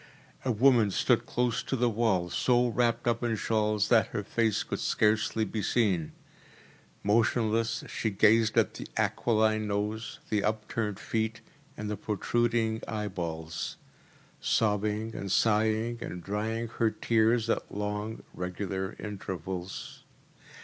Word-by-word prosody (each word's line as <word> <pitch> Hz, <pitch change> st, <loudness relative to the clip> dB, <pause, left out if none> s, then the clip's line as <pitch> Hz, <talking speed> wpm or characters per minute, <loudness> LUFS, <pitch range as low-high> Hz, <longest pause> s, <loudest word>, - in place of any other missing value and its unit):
A 130 Hz, -, +1 dB
woman 120 Hz, -2 st, +5 dB
stood -, -, +2 dB
close 120 Hz, -2 st, 0 dB
to -, -, -2 dB
the 125 Hz, -1 st, +2 dB
wall, 105 Hz, -6 st, +1 dB
so 125 Hz, -1 st, +3 dB
wrapped 120 Hz, 0 st, +1 dB
up 115 Hz, -1 st, +1 dB
in 120 Hz, -2 st, 0 dB
shawls 105 Hz, -1 st, +1 dB
that 115 Hz, -3 st, +5 dB
her 105 Hz, -, -4 dB
face 110 Hz, +1 st, +1 dB
could -, -, -4 dB
scarcely 110 Hz, +1 st, +2 dB
be 110 Hz, +1 st, -3 dB
seen. 95 Hz, -7 st, +1 dB, 0.9 s
Motionless 115 Hz, +1 st, +2 dB
she 110 Hz, -, -2 dB
gazed 110 Hz, +2 st, +4 dB
at -, -, +3 dB
the -, -, -7 dB
aquiline 110 Hz, -2 st, +2 dB
nose, 105 Hz, +2 st, -2 dB
the 105 Hz, -2 st, +2 dB
upturned 105 Hz, -1 st, -1 dB
feet, 110 Hz, 0 st, -2 dB, 0.4 s
and 105 Hz, -, -4 dB
the 105 Hz, 0 st, -3 dB
protruding 115 Hz, +2 st, 0 dB
eyeballs; 85 Hz, -7 st, -4 dB, 0.6 s
sobbing 105 Hz, 0 st, 0 dB
and 100 Hz, -3 st, -5 dB
sighing, 110 Hz, +2 st, +2 dB
and 90 Hz, -5 st, -6 dB
drying 110 Hz, +4 st, -2 dB
her 115 Hz, -, +4 dB
tears 115 Hz, +1 st, +2 dB
at -, -, -1 dB
long, 105 Hz, +2 st, -3 dB
regular 95 Hz, +1 st, -4 dB
intervals. 95 Hz, -2 st, -6 dB
110 Hz, 130 wpm, -29 LUFS, 105-115 Hz, 0.9 s, woman